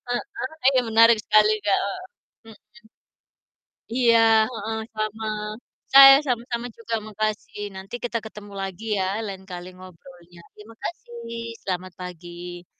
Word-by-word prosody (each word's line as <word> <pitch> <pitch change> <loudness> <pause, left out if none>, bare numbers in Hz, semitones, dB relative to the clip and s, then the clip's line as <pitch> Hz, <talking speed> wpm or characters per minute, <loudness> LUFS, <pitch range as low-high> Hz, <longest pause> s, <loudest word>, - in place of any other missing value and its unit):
Heeh, 245 +1 -4 0.2
iya 260 - +4
menarik 230 0 +6
sekali 215 0 +4
Kak, 205 -1 +2
heeh. 200 - -4 0.5
Mhm. 210 - -16 1.4
Iya, 235 -2 +5 0.3
heeh, 225 -1 -4 0.2
sama, 215 +1 -3 0.7
saya 270 0 +11
sama-sama 240 -1 -2
juga 230 0 -4
makasih, 215 0 -4
nanti 190 +4 -8
kita 235 -1 -2
ketemu 210 -1 -10
lagi 195 +3 -6
ya, 190 - 0 0.2
lain 190 -2 -7
kali 180 -1 -8
ngobrolnya. 175 -1 -15
Terima 215 +2 -14
kasih, 230 -6 -7
selamat 185 -1 -4
pagi. 175 0 -9
215 Hz, 120 wpm, -24 LUFS, 185-230 Hz, 1.4 s, saya